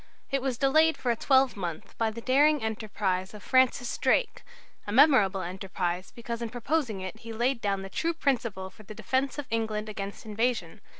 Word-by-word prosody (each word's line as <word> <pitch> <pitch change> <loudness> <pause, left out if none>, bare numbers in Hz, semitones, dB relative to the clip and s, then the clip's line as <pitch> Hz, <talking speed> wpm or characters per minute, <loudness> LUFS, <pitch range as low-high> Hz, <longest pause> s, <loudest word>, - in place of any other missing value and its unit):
It 275 -1 +1
was 260 -2 -1
delayed 315 +5 +4
for 245 - 0
a - - +1
twelvemonth 220 - +1
by 225 - +2
a - - -1
daring 270 +4 +3
enterprise 205 -3 -2
of 205 - -11
Francis 255 -2 +2
Drake, - - +1 0.5
a - - -3
memorable 215 -8 +5
enterprise, 185 0 -3
because 235 0 -5
in 235 - -3
proposing 245 -3 -1
it 190 +4 -6
he 230 0 -9
laid 240 +2 0
down 195 -2 -1
the - - -6
true 330 - -1
principle 230 -11 -1
for - - -16
the 215 0 -11
defence 260 +6 -1
of 290 - -4
England 220 -1 -1
against 200 +1 -6
invasion. 220 -4 -2
225 Hz, 180 wpm, -28 LUFS, 200-260 Hz, 0.5 s, memorable